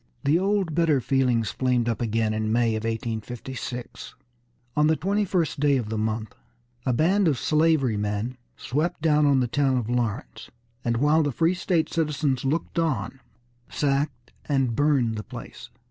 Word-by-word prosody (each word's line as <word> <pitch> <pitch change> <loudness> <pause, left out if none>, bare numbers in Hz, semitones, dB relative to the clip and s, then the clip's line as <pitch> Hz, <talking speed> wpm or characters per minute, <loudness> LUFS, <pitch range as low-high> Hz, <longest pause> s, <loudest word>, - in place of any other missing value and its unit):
The 150 +5 +3
old 195 -3 0
bitter 160 -3 +3
feelings 125 -4 +1
flamed 125 -2 0
up 115 0 -1
again 110 -1 0
in 110 0 -1
May 120 0 +3
of 110 +1 -3
1856. 120 +2 -5 0.6
On 150 0 +4
the 160 - +3
twenty 200 +7 0
first 170 -6 -1
of 135 -7 +2
the 110 - -2
month, 110 0 -2 0.5
a - - +3
band 180 +9 +3
of 145 -5 +2
slavery 155 -6 +2
men 105 +4 -2 0.2
swept 150 +5 -2
down 150 -2 +4
on 135 -2 +4
the 125 - +1
town 135 +1 +1
of 120 -1 -2
Lawrence, 120 0 -3 0.3
and 115 -1 0
while 150 +5 +4
the 145 -2 0
free 165 +6 +2
state 175 -2 0
citizens 150 -5 0
looked 155 +5 -1
on, 135 -6 -1 0.5
sacked 140 -4 -1 0.2
and 135 -5 +1
burned 135 -5 +2
the 105 - -4
place. - - -10
135 Hz, 160 wpm, -25 LUFS, 115-155 Hz, 0.6 s, On